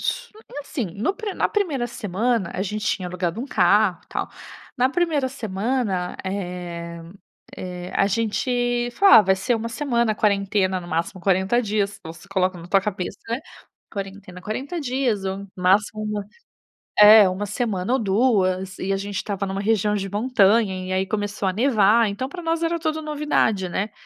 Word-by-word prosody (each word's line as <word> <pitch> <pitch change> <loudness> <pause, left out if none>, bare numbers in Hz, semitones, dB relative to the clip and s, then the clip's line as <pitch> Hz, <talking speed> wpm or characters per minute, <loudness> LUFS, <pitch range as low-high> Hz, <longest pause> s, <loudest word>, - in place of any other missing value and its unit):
Su - - -2 0.2
e - - -4
assim, 280 -5 -4
no 225 - 0
pri 435 -5 -5
na - - +1
1ª 320 - 0
semana, 220 -2 -1
a 190 - -1
gente 210 +1 -3
tinha 185 -2 -1
alugado 180 +3 -3
um 265 - -4
carro, 195 -4 +3
e - - -40
tal. - - -3 0.5
Na 255 +1 +3
1ª 300 -3 0
semana, 215 -5 -2
eh 175 -3 -5 0.6
eh, 180 -1 -6
a 195 - +3
gente 240 +3 0
falou: 395 +6 +6
"Ah, 220 - +8
vai 190 -1 +3
ser 235 +6 0
1 230 +1 -4
semana, 235 -3 0
quarentena, 200 -2 +1
no 175 - -10
máximo 170 +3 -2
40 190 +5 +2
dias", 205 -1 -1
você 165 +4 -10
coloca 185 -2 0
na 170 +1 -11
tua 195 - +4
cabeça, 190 -2 -4 0.8
"quarentena, 195 -2 -7
40 270 - -4
dias 250 -7 -1
ou 195 +1 -4
máximo 200 +4 +2
1" 210 -1 -3 0.7
é, 210 -1 +9
1 190 +3 -3
semana 205 -1 -2
ou 265 - +3
2, 190 -4 +1
e 195 +1 -2
a - - +1
gente 200 0 -5
estava 200 -1 -2
numa 195 +1 -3
região 210 -1 +1
de 195 -1 -3
montanha, 215 -2 +3
e 185 - -4
aí 190 +1 0
começou 205 0 -2
a - - 0
nevar, 225 0 +4
então 205 +6 -3
para 350 +5 -8
nós 330 0 -1
era 335 +1 0
tudo 315 -1 -2
novidade, 295 -10 0
né. 200 +4 -2
205 Hz, 175 wpm, -23 LUFS, 190-245 Hz, 0.8 s, é